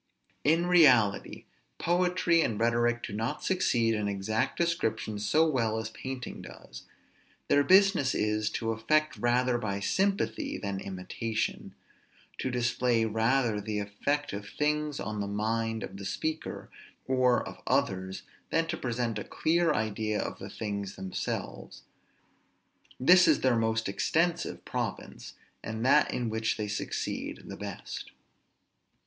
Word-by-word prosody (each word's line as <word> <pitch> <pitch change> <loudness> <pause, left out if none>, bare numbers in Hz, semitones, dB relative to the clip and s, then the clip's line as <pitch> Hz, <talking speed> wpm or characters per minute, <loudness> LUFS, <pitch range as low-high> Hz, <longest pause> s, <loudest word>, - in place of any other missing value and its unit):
In 165 +4 +3
reality, 130 - +4 0.3
poetry 175 -1 +2
and 110 -9 -1
rhetoric 120 +1 +2
do 105 - -5
not 115 +3 -3
succeed 120 -11 +2
in 105 -1 -1
exact 100 +2 -1
description 110 -11 -1
so 155 +10 +3
well 115 -7 0
as 110 0 -4
painting 130 +1 -6
does; - - -12 0.6
their 145 - +5
business 190 -5 +5
is, 105 0 0
to 115 0 -2
affect 155 +8 +1
rather 120 +1 +2
by 100 -3 -2
sympathy 195 - 0
than 100 -2 -3
imitation; 100 +4 -4 0.6
to 130 - -1
display 120 -1 +1
rather 110 0 +1
the 105 +1 -3
effect 105 +9 -2
of 100 0 -6
things 150 -1 -1
on 105 +1 -4
the 100 - -2
mind 110 +2 -1
of - - -7
the 100 - -7
speaker, 160 +9 -4 0.4
or 130 -1 +2
of - - -10
others, 95 -9 0 0.3
than 165 0 +2
to - - -3
present 120 -3 -2
a - - -4
clear 170 0 +1
idea 110 -3 -1
of - - -4
the - - -7
things 100 -2 -4
themselves. 95 -1 -5 1.2
This 180 +7 +7
is - - +4
their 130 -2 +3
most 110 -1 0
extensive 165 - 0
province, - - -5 0.3
and 110 +2 -4
that 145 +2 +5
in 120 -3 -2
which 110 0 -1
they 105 -1 -2
succeed 105 0 -4
the - - -7
best. - - -7
115 Hz, 135 wpm, -29 LUFS, 105-145 Hz, 1.2 s, This